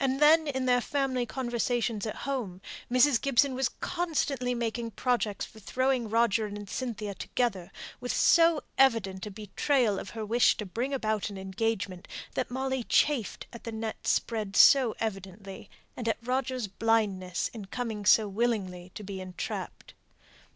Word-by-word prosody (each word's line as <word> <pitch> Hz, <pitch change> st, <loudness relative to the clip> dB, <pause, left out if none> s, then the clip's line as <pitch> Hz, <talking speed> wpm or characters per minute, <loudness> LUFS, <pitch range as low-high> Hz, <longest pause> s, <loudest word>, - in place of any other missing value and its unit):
Then 300 Hz, +4 st, +5 dB
in 265 Hz, -2 st, -1 dB
their 245 Hz, -1 st, +3 dB
family 260 Hz, -3 st, -1 dB
conversations 240 Hz, -3 st, -1 dB
at 215 Hz, -, -4 dB
home, 240 Hz, -10 st, -3 dB, 0.3 s
Mrs. 255 Hz, -1 st, +4 dB
Gibson 275 Hz, 0 st, +3 dB
was 260 Hz, 0 st, 0 dB
constantly 290 Hz, -8 st, -1 dB
making 235 Hz, 0 st, -2 dB
projects 240 Hz, -5 st, 0 dB
for 220 Hz, -, -15 dB
throwing 255 Hz, +2 st, 0 dB
Roger 225 Hz, -1 st, +2 dB
and 205 Hz, 0 st, -7 dB
Cynthia 215 Hz, -4 st, -4 dB
together, 195 Hz, -4 st, -2 dB, 0.3 s
with 245 Hz, -, -3 dB
so 330 Hz, -2 st, +4 dB, 0.2 s
evident 215 Hz, -7 st, +3 dB
a -, -, -5 dB
betrayal 210 Hz, +2 st, 0 dB
of -, -, -7 dB
her 220 Hz, -, -3 dB
wish 230 Hz, +3 st, +3 dB
to 210 Hz, -, -4 dB
bring 235 Hz, +8 st, -3 dB
about 215 Hz, -6 st, -1 dB
an 200 Hz, -, -8 dB
engagement, 190 Hz, -1 st, -3 dB, 0.3 s
that 255 Hz, -, -2 dB
Molly 265 Hz, 0 st, -2 dB
chafed 265 Hz, -3 st, +1 dB
at 235 Hz, -, -10 dB
the 230 Hz, -, -5 dB
net 220 Hz, 0 st, -5 dB
spread 215 Hz, -4 st, 0 dB
so 255 Hz, -4 st, +7 dB
evidently, 195 Hz, 0 st, -6 dB, 0.3 s
and 240 Hz, -, -5 dB
at -, -, 0 dB
Roger's 255 Hz, -1 st, -1 dB
blindness 195 Hz, -4 st, 0 dB
in 220 Hz, -4 st, -7 dB
coming 220 Hz, 0 st, -4 dB
so 210 Hz, +1 st, +5 dB
willingly 195 Hz, -5 st, -2 dB
to 210 Hz, -, -7 dB
be 195 Hz, -1 st, -6 dB
entrapped. 185 Hz, -1 st, -6 dB
230 Hz, 150 wpm, -29 LUFS, 205-255 Hz, 0.3 s, so